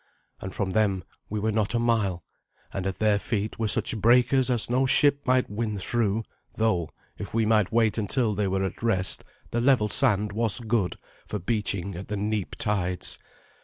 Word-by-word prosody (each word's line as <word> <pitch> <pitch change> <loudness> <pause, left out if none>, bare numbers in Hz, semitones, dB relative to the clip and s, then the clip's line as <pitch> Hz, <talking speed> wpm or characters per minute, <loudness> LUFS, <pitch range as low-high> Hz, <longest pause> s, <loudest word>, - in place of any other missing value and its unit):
And 95 - -6
from 95 0 -2
them 100 -3 +1 0.3
we 105 - -2
were 110 +2 0
not 110 +1 0
a - - +2
mile, 110 -7 0 0.5
and 95 0 -3
at 95 - -3
their 105 -2 +2
feet 110 0 -3
were 110 - 0
such 105 - +1
breakers 125 +4 +4
as 120 -3 +3
no 130 +2 +1
ship 140 +2 +4
might 130 0 +3
win 105 0 -3
through, 110 +2 -1 0.3
though, 95 -8 0 0.3
if 100 +1 -6
we 115 -1 +2
might 105 -3 +2
wait 115 -1 +2
until 110 +1 0
they 100 0 -1
were 95 0 0
at 95 - -4
rest, 100 -6 +2 0.3
the 120 - 0
level 125 -4 +3
sand 105 -6 +2
was 110 +1 0
good 110 -5 -1 0.3
for 105 - -3
beaching 100 -1 -2
at 90 +3 -7
the 105 - -3
neap 105 -1 -2
tides. 90 -4 -1
105 Hz, 185 wpm, -26 LUFS, 100-115 Hz, 0.5 s, breakers